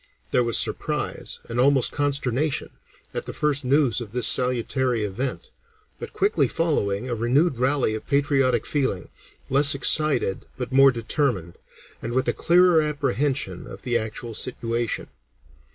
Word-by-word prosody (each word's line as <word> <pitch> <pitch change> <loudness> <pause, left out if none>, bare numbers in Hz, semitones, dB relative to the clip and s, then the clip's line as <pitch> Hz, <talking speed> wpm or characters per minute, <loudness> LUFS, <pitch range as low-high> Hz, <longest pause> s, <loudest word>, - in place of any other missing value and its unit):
There 125 - +2
was 115 -1 +2
surprise, - - -1
and 115 +1 -4
almost 135 0 +3
consternation, 145 0 -1 0.4
at - - -5
the - - -6
first 145 -1 0
news 130 -2 +2
of 110 -3 -9
this 125 -2 +1
salutary 125 -1 +1
event, 115 +7 -5 0.5
but - - -8
quickly 405 - +1
following, 125 -10 -1
a 125 - -3
renewed 125 +5 +1
rally 130 -3 +1
of 110 - -7
patriotic 140 -2 +1
feeling, 130 - -2 0.4
less 140 +1 +6
excited 140 -6 +2
but 125 0 -5
more 135 +1 +6
determined, 115 - -1 0.4
and 115 - -5
with 130 +1 0
a - - +2
clearer 175 -1 +4
apprehension 145 -1 -2
of - - -11
the 120 -2 -2
actual 115 +1 -4
situation. 115 0 -3
130 Hz, 140 wpm, -23 LUFS, 115-145 Hz, 0.5 s, less